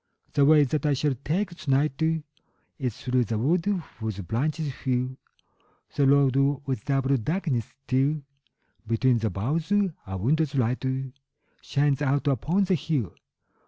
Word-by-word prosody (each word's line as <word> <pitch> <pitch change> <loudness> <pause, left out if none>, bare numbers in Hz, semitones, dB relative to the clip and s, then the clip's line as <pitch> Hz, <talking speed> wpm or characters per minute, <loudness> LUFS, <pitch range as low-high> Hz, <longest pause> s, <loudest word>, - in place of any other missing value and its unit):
The 140 - +4
way 150 0 +6
that 145 +1 -1
I 150 -1 +2
shall 145 +1 +1
take 165 - -2
to 155 -4 -8
night 135 +2 +2 0.8
Is 125 -6 -2
through 125 -1 +1
the 110 +1 -2
wood 165 - +1 0.3
whose 110 -3 -3
branches 140 - -2
fill 130 0 -2 0.8
The 140 -2 +3
road 140 -2 +4 0.3
with 130 -6 -3
double 135 -1 +2
darkness, 135 - -2
till, 140 +3 +1 0.6
Between 120 +2 +2
the 110 0 0
boughs, 145 - -2 0.4
a 95 0 -4
window's 145 - +1
light 125 0 0 0.8
Shines 145 -1 +1
out 140 +1 +1
upon 155 +7 +1
the 190 - +1
hill. 145 - -1
135 Hz, 140 wpm, -26 LUFS, 125-150 Hz, 0.8 s, way